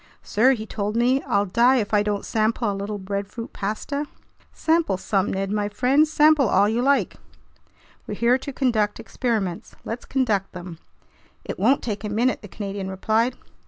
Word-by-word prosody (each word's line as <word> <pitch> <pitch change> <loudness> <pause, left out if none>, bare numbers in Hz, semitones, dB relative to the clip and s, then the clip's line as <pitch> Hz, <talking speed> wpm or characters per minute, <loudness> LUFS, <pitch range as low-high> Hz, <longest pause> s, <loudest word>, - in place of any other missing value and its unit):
"Sir," 255 +5 +3
he 220 -4 -5
told 210 -1 -3
me, 250 +3 +3
"I'll 200 0 +2
die 240 +7 +4
if 220 -4 -1
I 205 - +5
don't 205 -1 -2
sample 220 0 0
a - - -3
little 200 +1 -4
breadfruit 200 +4 -5
pasta!" 280 +9 -3 0.4
"Sample 325 - +1
some, 195 +1 0
Ned 195 0 -2
my 205 -1 -1
friend, 260 +8 +3
sample 300 -4 +4
all 200 +2 +4
you 225 +3 0
like. 275 +2 +1 0.9
We're - - -4
here 240 +2 +3
to 280 - -6
conduct 225 -6 0
experiments, 215 -9 -3
let's 230 +2 -5
conduct 220 -8 0
them." 175 -2 -8 0.7
"It - - -5
won't 275 - +3
take 210 -3 -4
a 210 - -3
minute," 235 +5 +1
the 205 - -10
Canadian 195 -1 -5
replied. 220 +6 0
215 Hz, 170 wpm, -23 LUFS, 200-255 Hz, 0.9 s, I